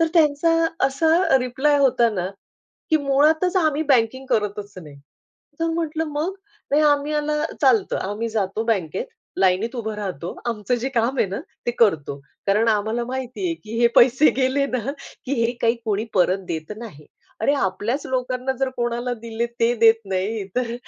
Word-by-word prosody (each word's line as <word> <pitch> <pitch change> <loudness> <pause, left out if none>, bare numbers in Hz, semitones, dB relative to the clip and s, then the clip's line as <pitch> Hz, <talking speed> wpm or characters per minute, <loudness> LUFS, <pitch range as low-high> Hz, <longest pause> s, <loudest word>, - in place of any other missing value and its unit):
तर 330 - +4
त्यांचा 310 0 +3 0.4
असा 320 +2 +3
रिप्लाय 265 +4 +1
होता 245 -4 +4
ना, 180 -4 -2 0.6
की 315 - +5
"मुळातचं 310 +6 +2
आम्ही 310 -1 +1
बँकिंग 260 0 +2
करतच 205 -1 -1
नाही." 150 -5 -11 0.6
तर 330 - +1
म्हंटलं, 320 -1 -1
"मग?" 320 +6 -2 0.4
"नाही 300 +2 +3
आम्ही 290 0 +2
याला 300 0 0 0.2
चालत. 250 -8 +3
आम्ही 205 +4 -3
जातो 215 -1 -1
बँकेत, 220 - -1 0.3
लाईनीत 195 +6 +2
उभं 220 -2 -3
राहतो, 185 -6 -5
आमचं 225 +1 -1
जे 245 +2 -2
काम 240 +3 +1
आहे - - +3
ना, 195 - -4 0.3
ते 240 - +3
करतो. 160 -11 +2 0.3
कारण 210 +3 +3
आम्हाला 220 +2 0
माहिती 260 +6 -5
आहे 335 - -1
की 220 +2 -5
हे 235 - +6
पैसे 260 +5 +6
गेले 270 +1 +1
ना 255 0 -2 0.3
की 265 - -3
हे 235 - +1
काही 230 +1 +3
कोणी 215 0 0
परत 185 0 +3
देत 160 +3 -4
नाही. 205 -11 -10 0.3
अरे 250 +6 +3
आपल्याच 215 +4 -1
लोकांना, 255 0 -1
जर 270 - +2
कोणाला 240 +1 -1
दिले 230 0 -4
ते 235 +1 +3
देत 225 0 +6
नाही, 195 +2 -2
तर 240 -2 -1
240 Hz, 165 wpm, -22 LUFS, 210-280 Hz, 0.6 s, हे